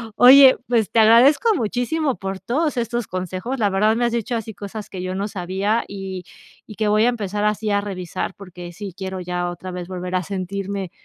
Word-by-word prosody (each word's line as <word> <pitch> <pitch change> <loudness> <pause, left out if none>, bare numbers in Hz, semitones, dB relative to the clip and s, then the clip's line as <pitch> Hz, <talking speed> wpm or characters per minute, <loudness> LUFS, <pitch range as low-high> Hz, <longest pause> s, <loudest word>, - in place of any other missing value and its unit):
oye, 265 +2 +8
pues, 230 -4 +1
te 230 - +3
agradezco 265 - +5
muchísimo 250 +5 -1
por 195 0 -5
todos 300 +5 -1
estos 235 -1 -2
consejos, 185 +8 -4
la 205 -2 +2
verdad, 210 +3 +2
me 240 +1 +1
has 235 - 0
dicho 235 +1 -2
así 225 -1 -5
cosas 205 +1 -8
que 185 - -7
yo 185 0 -4
no 200 +2 -2
sabía 195 +4 -1
y 190 -2 -6 0.4
y 215 - -11
que 215 0 0
voy 215 +2 +3
a - - +4
empezar 210 -3 -2
así 210 0 0
a 200 - +2
revisar 185 -1 -5
porque, 180 -3 -10
sí 195 -1 -7
quiero 190 -1 -5
ya 175 0 -3
otra 180 +1 -7
vez 180 -1 -6
volver 180 0 -5
a 185 - 0
sentirme 195 0 -4
200 Hz, 205 wpm, -21 LUFS, 185-230 Hz, 0.4 s, oye